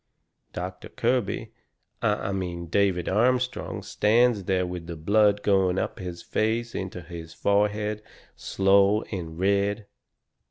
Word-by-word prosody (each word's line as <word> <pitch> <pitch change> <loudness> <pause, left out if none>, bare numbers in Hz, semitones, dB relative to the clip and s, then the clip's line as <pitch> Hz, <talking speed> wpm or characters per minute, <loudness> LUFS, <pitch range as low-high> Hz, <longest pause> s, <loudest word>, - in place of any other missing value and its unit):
Doctor 90 +1 -6
Kirby 120 -4 -1 0.5
I 100 - 0
mean 90 -3 -3
David 95 -2 +1
Armstrong 125 +5 0
stands 110 -1 +2
there 90 -1 +1
with 90 -2 -6
the 85 - -5
blood 105 +5 +3
going 95 -2 +2
up - - -2
his 90 -2 -6
face 115 +2 -1
into 95 -1 -5
his 85 -1 -9
forehead 105 +1 +1 0.3
slow 100 +2 +3
and 85 -5 -5
red. 100 +3 +1
100 Hz, 120 wpm, -26 LUFS, 90-105 Hz, 0.5 s, blood